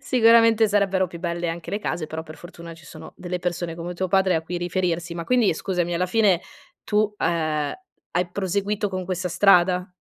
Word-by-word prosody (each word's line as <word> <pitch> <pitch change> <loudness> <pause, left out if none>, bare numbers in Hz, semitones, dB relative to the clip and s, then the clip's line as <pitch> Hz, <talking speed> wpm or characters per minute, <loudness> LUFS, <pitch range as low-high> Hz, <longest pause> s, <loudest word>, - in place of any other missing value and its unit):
sicuramente 230 -4 +5
sarebbero 195 -2 +2
più 170 0 -10
belle 170 -1 -2
anche 165 0 -5
le 205 - -1
case, 175 -6 -4
però, 160 +1 -6
per 155 0 -11
fortuna, 170 -1 -11
ci 165 - -17
sono 160 0 -11
delle 180 0 -4
persone 175 -1 -3
come 175 +1 -6
tuo 185 +1 -2
padre 190 -1 +3
a 160 - 0
cui 175 +2 -5
riferirsi. 175 -1 -2
Ma 170 - -5
quindi, 240 -7 +2
scusami, 175 -1 -2
alla 180 +2 0
fine, 195 -3 +3 0.4
tu, 210 0 0
ehm, 155 -4 -1 0.4
hai 175 0 0
proseguito 200 +2 -1
con 185 -1 -4
questa 185 0 -3
strada? 180 0 +3
180 Hz, 190 wpm, -23 LUFS, 170-195 Hz, 0.4 s, sicuramente